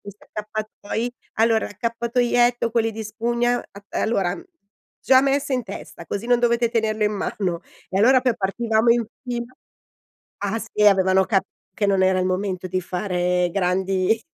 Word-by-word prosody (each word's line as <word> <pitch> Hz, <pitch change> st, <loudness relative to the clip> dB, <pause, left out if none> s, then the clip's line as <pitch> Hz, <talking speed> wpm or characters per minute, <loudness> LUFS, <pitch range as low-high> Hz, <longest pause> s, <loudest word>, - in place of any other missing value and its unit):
questi 200 Hz, 0 st, -12 dB
accappatoi: 215 Hz, +2 st, -4 dB, 0.3 s
"Allora 225 Hz, 0 st, +3 dB
l'accappatoietto 235 Hz, +2 st, +1 dB
quelli 225 Hz, -1 st, +1 dB
di 220 Hz, +1 st, -5 dB
spugna 235 Hz, +3 st, 0 dB
a -, -, -3 dB, 0.4 s
uhm, -, -, +1 dB
allora 195 Hz, -5 st, +1 dB
uhm 345 Hz, -, -11 dB, 0.6 s
già 260 Hz, 0 st, +5 dB
messa 275 Hz, 0 st, +1 dB
in 250 Hz, -, -1 dB
testa 195 Hz, -4 st, -9 dB
così 200 Hz, +6 st, -4 dB
non 245 Hz, 0 st, +4 dB
dovete 235 Hz, -1 st, +2 dB
tenerlo 220 Hz, -2 st, 0 dB
in 210 Hz, 0 st, +2 dB
mano." 185 Hz, -4 st, -2 dB, 0.3 s
E 190 Hz, -, -1 dB
allora 255 Hz, +4 st, +6 dB
poi 250 Hz, -3 st, +1 dB
partivamo 220 Hz, +3 st, +1 dB
in 235 Hz, 0 st, +3 dB, 0.2 s
fila 240 Hz, 0 st, -4 dB, 0.9 s
ah, 205 Hz, +3 st, -2 dB
sì 215 Hz, -1 st, -1 dB
avevano 190 Hz, -1 st, +5 dB
capito 195 Hz, -2 st, +1 dB, 0.3 s
che 205 Hz, -, 0 dB
non 195 Hz, -1 st, +2 dB
era 185 Hz, 0 st, +3 dB
il 185 Hz, -, +1 dB
momento 185 Hz, 0 st, -2 dB
di 185 Hz, 0 st, -1 dB
fare 180 Hz, -1 st, 0 dB
grandi 190 Hz, +3 st, +1 dB
215 Hz, 165 wpm, -22 LUFS, 190-235 Hz, 0.9 s, allora